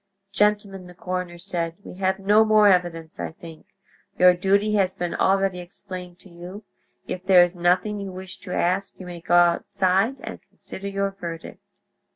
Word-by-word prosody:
"Gentlemen," 205 -2 0
the 180 - -14
coroner 180 0 -4
said, 170 -2 -3
"we - - -10
have 190 0 0
no 205 +3 +4
more 215 -1 +5
evidence, 175 -3 0
I - - -4
think. 165 -1 -13 0.5
Your 180 0 +7
duty 200 +4 +1
has 190 -3 +1
been 175 -1 -3
already 195 -1 +1
explained 180 0 -9
to 195 - -16
you; 180 +4 -10 0.4
if 185 - -5
there 185 -2 +7
is 175 0 -1
nothing 180 +4 +1
you 195 -1 -5
wish 185 0 -8
to 185 -1 -9
ask 190 +3 -1
you 185 - -8
may 175 -1 -8
go 175 - +1
outside 185 +5 +3
and - - -8
consider 195 +1 -8
your 195 0 -1
verdict." 170 -4 -8
185 Hz, 175 wpm, -24 LUFS, 175-195 Hz, 0.5 s, Your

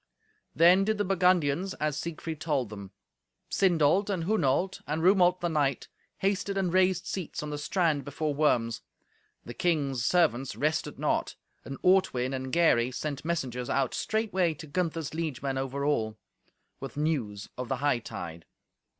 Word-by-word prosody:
Then 180 +3 +6
did 215 +1 0
the 205 - 0
Burgundians 180 -2 +2
as 150 -2 -1
Siegfried 160 0 -5
told 140 -8 0
them. 100 -2 -8 0.6
Sindolt, 185 +1 +3
and 185 -5 -1
Hunolt, 185 -1 +1
and 155 +2 -2
Rumolt 180 -1 +4
the 175 - +1
knight, 145 -5 0 0.3
hasted 200 0 -1
and 185 -3 0
raised 185 -1 +3
seats 180 -5 -4
on 150 - -5
the 145 - -4
strand 155 -2 +1
before 145 +1 -2
Worms. 120 -6 +1 0.6
The 120 - -7
king's 140 -6 0
servants 135 -4 +2
rested 155 +2 -1
not. - - -1 0.3
And 135 - -7
Ortwin 135 -9 +3
and 130 0 -4
Gary 130 -8 +3
sent 140 +2 -4
messengers 130 -7 -2
out 135 -2 0
straightway 190 -7 0
to 155 - -9
Gunther's 165 -1 -2
liegemen 140 -4 -2
over 135 +1 -3
all, 110 -7 0 0.6
with 135 +1 -8
news 125 -10 -2
of 125 -1 -5
the 135 - +1
hightide. 115 - -3
155 Hz, 150 wpm, -28 LUFS, 135-180 Hz, 0.6 s, Then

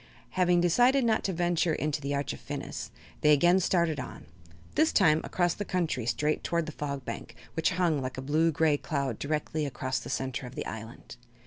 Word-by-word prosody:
Having 180 -1 +3
decided 245 +10 +4
not 220 -1 +2
to 195 - +1
venture 175 -2 +1
into 150 0 -2
the 140 0 -2
Arch 140 0 -2
of - - -9
Phinis - - -6 0.3
they 150 - +5
again 175 +5 +5
started 170 -4 +1
on, - - -7 0.5
this 315 +1 +3
time 160 -5 +4
across 175 -2 +1
the 205 - -4
country 170 - -1
straight 150 +4 0
toward 170 -1 0
the 155 - -5
Fog 140 -3 -5
Bank, - - -6 0.2
which 160 - +1
hung 170 -5 +1
like 130 0 -4
a - - -3
blue 155 +4 +2
gray 155 -1 +2
cloud 140 -6 -2
directly 150 +1 -2
across 130 -2 -2
the - - -9
center 130 -1 -3
of 125 - -11
the - - -4
island. 115 +2 -8
155 Hz, 200 wpm, -29 LUFS, 140-175 Hz, 0.5 s, they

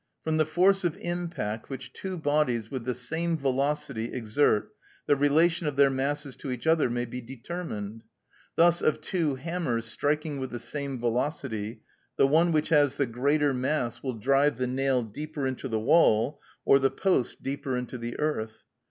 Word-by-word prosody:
From 160 0 0
the 155 -1 +2
force 185 +4 +3
of 170 -3 0
impact 170 -12 -4
which 130 -2 -7
two 190 -1 -5
bodies 145 -8 0
with 130 -4 -4
the 125 -1 -1
same 160 +7 -1
velocity 135 -3 -1
exert 110 -1 +1 0.3
the 145 - +4
relation 160 +4 +3
of 145 - -2
their 140 0 +5
masses 140 +1 -2
to 140 - -7
each 125 +1 -4
other 160 -5 +3
may 120 +1 -1
be 125 +1 -6
determined. 115 - -6 0.5
Thus 170 +1 +4
of 155 - +2
two 160 -7 -1
hammers 130 -5 -2
striking 145 +4 -1
with 130 -1 -4
the 120 - -5
same 140 +1 -4
velocity, 115 -3 -2 0.3
the - - +5
one 160 +5 +4
which 155 -1 +1
has 145 -4 +4
the 140 - +1
greater 140 +4 +1
mass 130 -1 -1
will 130 -3 -3
drive 135 +4 +2
the 130 - 0
nail 130 0 +1
deeper 145 +6 -5
into 130 0 -3
the 110 -3 -1
wall 140 0 +3 0.3
or 135 - +6
the 135 0 +3
post 185 -9 0
deeper 135 -1 -2
into 125 0 -5
the 120 0 -5
earth. 110 -8 -2
140 Hz, 175 wpm, -28 LUFS, 125-155 Hz, 0.5 s, or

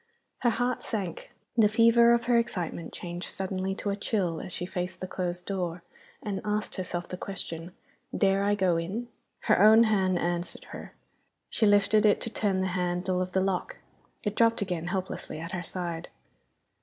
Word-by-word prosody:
Her 240 - +3
heart 245 +2 0
sank; 195 -7 -4 0.2
the 225 -3 +6
fever 230 +2 +6
of 235 0 +3
her 240 -1 +4
excitement 180 -7 -3
changed 175 0 -6
suddenly 190 0 -2
to 205 - -2
a - - -1
chill 195 -5 -1
as - - -7
she 175 - -4
faced 180 0 -4
the - - -4
closed 180 -1 -3
door, 180 -3 -3 0.4
and 200 -3 -3
asked 210 0 -1
herself 175 -2 -4
the 180 - -6
question, 175 -3 -6 0.4
Dare 195 0 +3
I 205 +1 +3
go 185 -4 +2
in? 200 +9 -3 0.3
Her - - +3
own 220 +2 +8
hand 190 -5 +2
answered 175 0 -2
her. - - -9 0.6
She 220 - +3
lifted 205 +1 +4
it 205 - +4
to 230 - -4
turn 195 -4 0
the 190 - 0
handle 180 0 0
of 185 0 -3
the 190 - +3
lock. 195 - -1 0.5
It 210 - -1
dropped 230 -2 +3
again 175 -3 -3
helplessly 185 -4 -4
at 165 +2 -6
her 185 - -3
side. 175 -1 -4
190 Hz, 180 wpm, -28 LUFS, 180-210 Hz, 0.6 s, own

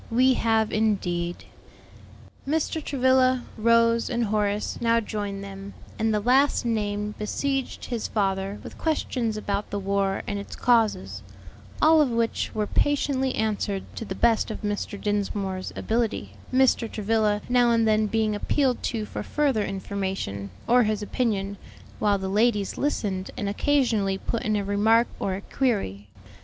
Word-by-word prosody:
"We 255 +3 +4
have 225 -2 +1
indeed." 175 -5 0 1.0
Mr. 315 +1 -1
Travilla, 260 -2 +3
Rose, 230 +1 +3
and 235 0 0
Horace 210 0 -1
now 230 0 +3
joined 205 -3 -4
them, 195 0 -9 0.2
and 220 0 +2
the 210 - +2
last 260 +5 +3
named 210 -2 -2
besieged 270 +5 -2
his 235 -3 -3
father 195 -1 -1
with - - -10
questions 250 -8 -1
about 205 -1 -2
the 205 - -3
war 195 0 0
and 205 -1 -3
its 200 - -8
causes; 210 - +1 0.6
all 315 0 +7
of 285 - +3
which 230 -1 0
were 215 -1 0
patiently 270 0 +1
answered 205 -3 -1
to - - -5
the 190 -3 -5
best 230 0 +2
of 220 - -6
Mr. 205 -1 -3
Dinsmore's 200 -2 -2
ability, 220 - -1 0.2
Mr. 255 -3 +3
Travilla 215 -1 +1
now 245 -1 +4
and 230 -1 +3
then 215 0 +3
being 220 0 +1
appealed 255 +4 0
to 225 -3 -2
for - - -6
further 275 -8 +1
information, 190 - -4 0.2
or 245 +1 +5
his 215 -2 0
opinion, 200 -4 -1 0.4
while 205 -1 +2
the 190 0 -4
ladies 210 0 +1
listened 200 -10 -2
and 205 - -2
occasionally 215 -4 +1
put 230 - -3
in 215 0 0
a 205 - 0
remark 220 +4 +3
or 190 - -1
a 195 - -6
query. 195 - -1
215 Hz, 150 wpm, -25 LUFS, 200-240 Hz, 1.0 s, all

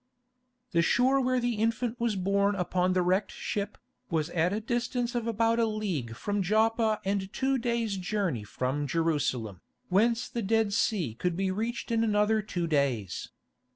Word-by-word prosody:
The 170 - +3
shore 260 +9 +3
where 255 0 +1
the 240 -2 -1
infant 230 +2 0
was 235 -3 0
born 200 +2 +1
upon 180 0 +1
the 180 -1 +2
wrecked 185 +3 +1
ship, 205 0 -4 0.3
was 160 -3 -1
at 170 +1 +1
a 210 - -1
distance 240 +2 -1
of 235 -2 -2
about 230 +1 +2
a 230 - +3
league 185 - -3
from 205 - -2
Joppa 220 +2 +2
and 195 -1 -1
two 265 +2 0
days' 230 -4 -1
journey 185 - -1
from 130 +7 -2
Jerusalem, 135 - -1 0.3
whence 225 +5 +2
the 235 - -4
Dead 220 0 +1
Sea 190 - +1
could 175 +8 -2
be 190 0 0
reached 230 +4 -3
in 230 0 +2
another 215 0 +2
two 180 -4 -3
days. 135 - -1
205 Hz, 165 wpm, -29 LUFS, 175-230 Hz, 0.3 s, The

